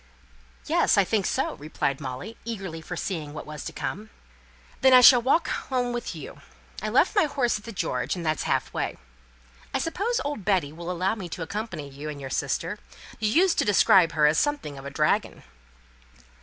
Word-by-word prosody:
"Yes, -, -, +3 dB
I 200 Hz, -, +6 dB
think 200 Hz, 0 st, 0 dB
so," -, -, -1 dB
replied 140 Hz, -2 st, -2 dB
Molly, 135 Hz, -, -6 dB
eagerly 195 Hz, -8 st, -5 dB
foreseeing 155 Hz, -2 st, -5 dB
what -, -, -6 dB
was 150 Hz, -1 st, -7 dB
to -, -, -4 dB
come. 215 Hz, +2 st, -5 dB, 0.7 s
"Then 265 Hz, 0 st, +6 dB
I 255 Hz, -, +9 dB
shall 245 Hz, 0 st, +9 dB
walk 275 Hz, +7 st, +2 dB
home 250 Hz, -2 st, -2 dB
with 240 Hz, -, -4 dB
you. -, -, -9 dB, 0.4 s
I -, -, -2 dB
left -, -, +3 dB
my 405 Hz, -, +5 dB
horse 255 Hz, -7 st, 0 dB
at 210 Hz, -, -17 dB
the 230 Hz, -, -6 dB
'George,' 195 Hz, -, -2 dB
and 175 Hz, -2 st, -6 dB
that's 155 Hz, -1 st, 0 dB
half -, -, 0 dB
way. -, -, -2 dB, 0.8 s
I -, -, +4 dB
suppose 400 Hz, -, -1 dB
old 285 Hz, -8 st, -3 dB
Betty 180 Hz, -7 st, +1 dB
will 170 Hz, +2 st, -7 dB
allow 180 Hz, +3 st, 0 dB
me 195 Hz, -6 st, -6 dB
to 165 Hz, -, -5 dB
accompany 170 Hz, -4 st, -5 dB
you 140 Hz, +2 st, -8 dB
and 145 Hz, -1 st, -7 dB
your 135 Hz, -1 st, -7 dB
sister? -, -, -2 dB, 0.4 s
You 215 Hz, -1 st, +1 dB
used 350 Hz, -, +3 dB
to -, -, +4 dB
describe 190 Hz, -4 st, +5 dB
her 155 Hz, -1 st, +3 dB
as 150 Hz, +1 st, +4 dB
something 290 Hz, -, -1 dB
of 135 Hz, -, -11 dB
a -, -, -4 dB
dragon." 150 Hz, +2 st, 0 dB
190 Hz, 195 wpm, -26 LUFS, 155-245 Hz, 0.8 s, I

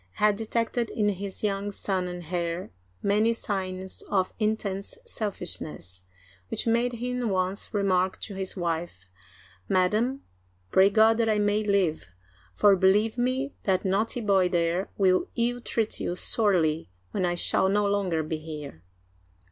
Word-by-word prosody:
had 210 Hz, 0 st, +3 dB
detected 230 Hz, +2 st, -1 dB
in 210 Hz, -2 st, +1 dB
His 195 Hz, 0 st, -4 dB
young 200 Hz, -1 st, 0 dB
son 190 Hz, -2 st, -1 dB
and 180 Hz, -1 st, -6 dB
heir 170 Hz, 0 st, -2 dB, 0.3 s
many 210 Hz, +3 st, +3 dB
signs 190 Hz, -4 st, -3 dB
of 190 Hz, -2 st, +1 dB
intense 210 Hz, -, -2 dB
selfishness, 170 Hz, -, -2 dB, 0.4 s
which -, -, -1 dB
made 235 Hz, +2 st, +2 dB
him 245 Hz, 0 st, -2 dB
once 190 Hz, +1 st, 0 dB
remark 190 Hz, -2 st, +1 dB
to 205 Hz, -, -4 dB
his 190 Hz, 0 st, -3 dB
wife: 165 Hz, -, -3 dB, 0.3 s
" 90 Hz, +1 st, -27 dB
Madam, 215 Hz, +9 st, +1 dB, 0.5 s
pray 190 Hz, +1 st, +6 dB
God 220 Hz, +2 st, +5 dB
that 230 Hz, -1 st, +2 dB
I 215 Hz, -, +2 dB
may 210 Hz, +1 st, +1 dB
live, 190 Hz, -, +1 dB, 0.4 s
for, 200 Hz, -, +5 dB
believe 210 Hz, +5 st, +3 dB
me, 260 Hz, +3 st, 0 dB
that 190 Hz, -1 st, 0 dB
naughty 210 Hz, +5 st, 0 dB
boy 195 Hz, -4 st, +3 dB
there 175 Hz, +1 st, 0 dB
will 185 Hz, -2 st, +3 dB
ill 240 Hz, +1 st, 0 dB
treat 225 Hz, -2 st, 0 dB
you 175 Hz, -, -2 dB
sorely 175 Hz, -, +1 dB, 0.2 s
when 185 Hz, -, -1 dB
I 175 Hz, -1 st, +1 dB
shall 190 Hz, +2 st, +3 dB
no 205 Hz, +1 st, +2 dB
longer 195 Hz, -5 st, 0 dB
be 155 Hz, +1 st, -3 dB
here." 150 Hz, -, -8 dB
195 Hz, 150 wpm, -27 LUFS, 180-215 Hz, 0.5 s, pray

